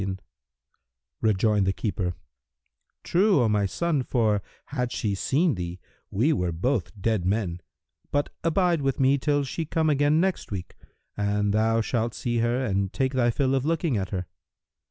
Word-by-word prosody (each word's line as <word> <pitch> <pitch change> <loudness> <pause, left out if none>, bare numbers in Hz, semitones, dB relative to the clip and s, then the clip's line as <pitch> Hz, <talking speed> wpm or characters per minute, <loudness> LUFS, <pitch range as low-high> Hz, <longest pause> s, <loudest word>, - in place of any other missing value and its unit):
"[FN#331] 95 -1 -2 1.0
Rejoined 105 -1 +2
the 95 - +2
keeper, 95 -4 -2 0.9
"True, 190 -1 +3
O - - +3
my 105 -2 +2
son, 165 - 0
for, 110 -5 +1 0.2
had 125 -4 -3
she 105 -2 -1
seen 145 - +1
thee, 90 -1 -5 0.3
we 125 +11 +2
were 90 -2 0
both 105 +5 -1
dead 110 -2 0
men: 90 -2 -1 0.5
but 145 0 0
abide 170 -1 +2
with 135 0 -1
me 135 +1 +4
till 145 +1 +1
she 140 +5 -3
come 160 0 +1
again 145 +2 +3
next 190 +1 0
week, 95 -3 -6 0.4
and 105 0 0
thou 110 +1 +2
shalt 115 0 -1
see 120 -1 -1
her 120 +3 +1
and 100 -3 0
take 130 0 -1
thy 125 -2 +3
fill 130 +2 +1
of 135 -1 +1
looking 160 -2 0
at 95 -3 -2
her." 90 -2 -3
115 Hz, 165 wpm, -26 LUFS, 100-145 Hz, 1.0 s, me